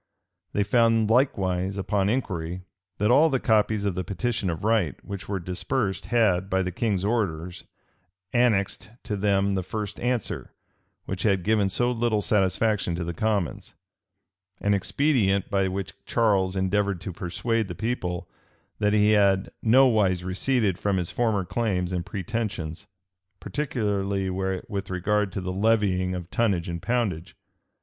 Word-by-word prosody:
They 105 - +2
found 115 0 +3
likewise, 95 -7 +1
upon 100 0 0
inquiry, 90 -7 -2 0.3
that 105 +3 +2
all 155 +6 +6
the 135 -3 +1
copies 110 -2 +2
of 100 - +1
the 90 +1 -3
petition 105 +2 -2
of 80 0 -4
right 105 - +2
which 100 +1 -7
were 100 -2 -1
dispersed, 95 +4 -2
had, 105 -5 +2
by 95 0 +1
the 90 - -3
king's 100 -1 -1
orders, 90 -6 -2 0.7
annexed 110 -7 +1
to 105 - -3
them 100 0 +1
the 95 - 0
first 105 +3 -5
answer, 120 -2 -2 0.5
which 90 -1 -4
had 95 -3 +2
given 105 -1 +2
so 120 +6 +1
little 115 -3 0
satisfaction 100 -1 +1
to 85 - -3
the 85 +1 -4
commons;[*] 100 -2 -2 0.8
an 105 - +1
expedient 100 - +1
by 95 -1 +2
which 95 0 -4
Charles 100 -5 +2
endeavored 100 0 0
to 90 +1 -5
persuade 95 +7 -1
the 90 - -6
people 95 -7 -3 0.5
that 105 -1 +2
he 105 0 +4
had 100 -2 +3
nowise 110 -7 +4
receded 95 +1 0
from 100 -2 0
his 90 -2 -2
former 110 -6 0
claims 95 -5 -1
and 90 -1 -1
pretensions, 100 -3 -4 0.5
particularly 100 - -1
with 95 +1 -3
regard 100 +2 0
to 95 - -4
the 90 0 -3
levying 95 -3 +1
of 90 -1 -7
tonnage 100 -7 +1
and 85 -1 -4
poundage. 110 -9 -1
100 Hz, 145 wpm, -26 LUFS, 95-110 Hz, 0.8 s, all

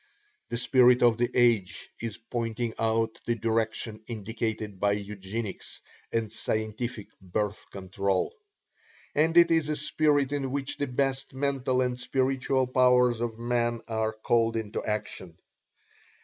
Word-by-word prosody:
The 120 - -2
spirit 125 0 +5
of 120 -1 +4
the 120 - +2
age 115 -5 +2
is 115 -3 -4
pointing 115 0 -3
out 115 0 0
the 120 - +2
direction 110 0 -2
indicated 110 -2 -4
by 100 +1 +3
Eugenics 100 +1 -5 0.3
and 115 -2 -1
scientific 110 0 -3
Birth 100 +3 -3
Control. 95 - -1 0.8
And 160 +3 +2
it 170 0 +7
is 160 -2 +2
a 150 - 0
spirit 145 -1 +1
in 140 -2 -1
which 135 +1 -3
the 145 - 0
best 135 +1 -1
mental 135 -2 0
and 125 -1 -1
spiritual 130 +1 +1
powers 125 -2 +4
of 115 -2 -2
man 120 0 0
are 110 -1 0
called 115 +1 +1
into 110 -2 -3
action. 95 -5 -4
115 Hz, 135 wpm, -28 LUFS, 110-130 Hz, 0.8 s, it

